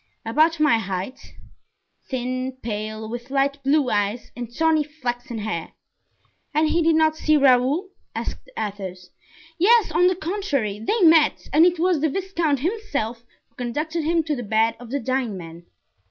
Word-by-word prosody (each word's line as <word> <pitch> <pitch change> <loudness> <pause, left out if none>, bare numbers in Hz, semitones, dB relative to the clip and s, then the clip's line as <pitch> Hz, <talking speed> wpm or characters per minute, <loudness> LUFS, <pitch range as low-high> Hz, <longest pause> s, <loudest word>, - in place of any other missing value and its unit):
"About 310 +8 +2
my 295 -7 +4
height; 195 +4 -6 0.7
thin, 255 0 -3
pale, 215 0 -4
with 240 +3 -7
light 275 +1 0
blue 275 -1 +2
eyes 205 +3 -1
and 240 -1 -6
tawny 320 +3 +2
flaxen 245 -5 -5
hair." 210 -6 -4 0.8
"And 310 0 +3
he 340 - +2
did 325 0 +3
not 315 0 +3
see 310 -1 +2
Raoul?" 275 +7 +3 0.3
asked - - -5
Athos. 190 -3 -5 0.5
"Yes, 440 +1 +5
on 345 +3 +4
the 370 - +2
contrary, 310 - -2
they 425 - 0
met, 320 -3 +5
and 320 +4 +7
it 355 0 +1
was 350 -1 +2
the 315 - +2
viscount 335 -5 -1
himself 280 - -2 0.2
who - - -40
conducted 305 +7 -3
him 330 +1 +1
to 305 -1 -1
the 245 - -4
bed 225 +1 +1
of 245 -1 -11
the 280 +3 -1
dying 255 -4 -1
man." 170 0 -10
270 Hz, 160 wpm, -23 LUFS, 225-320 Hz, 0.8 s, and